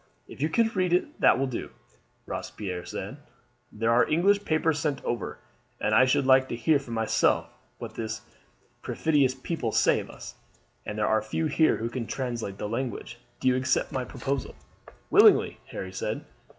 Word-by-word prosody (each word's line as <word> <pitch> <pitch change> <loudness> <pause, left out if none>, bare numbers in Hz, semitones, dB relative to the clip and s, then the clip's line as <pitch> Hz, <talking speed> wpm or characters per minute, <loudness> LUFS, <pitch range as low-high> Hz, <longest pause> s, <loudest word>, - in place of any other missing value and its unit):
"If - - -11
you 155 - +2
can 230 +8 +3
read 185 -5 0
it 240 - 0
that - - +6
will 135 - +1
do," 130 -3 -4 0.6
Robespierre 90 -4 -5
said. 100 +9 -6 0.5
"There 115 +2 0
are 120 +1 +4
English 200 +6 +3
papers 155 -1 +1
sent 145 -2 -1
over, 120 -4 -3 0.4
and - - 0
I 130 - +7
should 130 +1 +2
like 130 0 +5
to - - -2
hear 145 +5 +3
for 140 - -13
myself 115 -1 +1 0.3
what - - -7
this 110 -1 -4 0.6
perfidious 140 -5 +1
people 130 -3 -3
say - - +3
of - - -8
us, - - -9 0.5
and 105 - -4
there 105 - +1
are 110 0 +3
few 110 +9 -2
here 155 +1 +3
who 115 - -2
can 115 -1 -4
translate 120 -7 -4
the 105 - -4
language. 120 +1 -4 0.2
Do - - -1
you 130 - +4
accept 130 +1 0
my 130 - -2
proposal?" 135 +1 -4 0.6
"Willingly," - - +6
Harry 95 0 -6
said. - - -3
130 Hz, 175 wpm, -27 LUFS, 115-155 Hz, 0.6 s, I